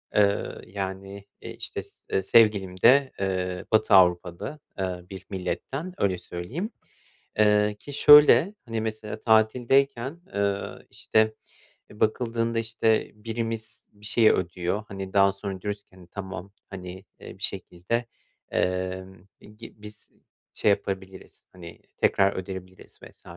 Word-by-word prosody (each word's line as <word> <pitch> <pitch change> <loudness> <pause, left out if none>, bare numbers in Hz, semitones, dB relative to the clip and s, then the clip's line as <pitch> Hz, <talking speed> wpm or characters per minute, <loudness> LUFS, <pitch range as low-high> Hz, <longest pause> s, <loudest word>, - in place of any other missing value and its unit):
Eee, 100 -1 +3 0.2
yani, 95 0 -6 0.2
eee, - - -8
işte, - - -5
s - - -15 0.2
e 95 - 0
sevgilim 95 -4 +3
de, 135 +3 +6
eee, 90 -1 -2
Batı 110 -1 +3
Avrupa'da, 90 - +2 0.2
eee, 90 -2 -3
bir 95 -1 -9
milletten, 135 - -4
öyle 95 -3 0
söyleyeyim. 90 - -5 0.7
Eee, 105 0 +4
ki 145 - -10
şöyle, 150 +7 +8
hani, 115 -2 -3
mesela, 110 -1 -5
tatildeyken, 125 +6 +2
eee, 100 -1 0 0.3
işte, 110 0 +1 0.6
e 105 - -15
bakıldığında, 115 +1 0
işte, 115 -1 +1
birimiz 115 +1 -5
bir 105 0 -14
şeyi 110 +1 +4
ödüyor, 90 +3 -2
hani, 95 -1 -7
daha 100 0 +5
sonra 100 -1 -6
diyoruz 105 0 -4
ki, - - -46
hani, 90 -2 -16
tamam, 95 0 -7 0.2
hani, 95 0 -8 0.2
bir - - -11
şekilde, 115 +8 -2 0.5
eee, 95 0 -1 0.4
i 105 - -16
gi 115 +1 -11
biz 105 -1 -12 0.4
şey - - +2
yapabiliriz, 95 -1 -4
hani, 85 -2 -12 0.2
tekrar 100 0 +3
ödeyebiliriz 95 0 -8
vs. - - -15
100 Hz, 130 wpm, -26 LUFS, 95-115 Hz, 0.7 s, şöyle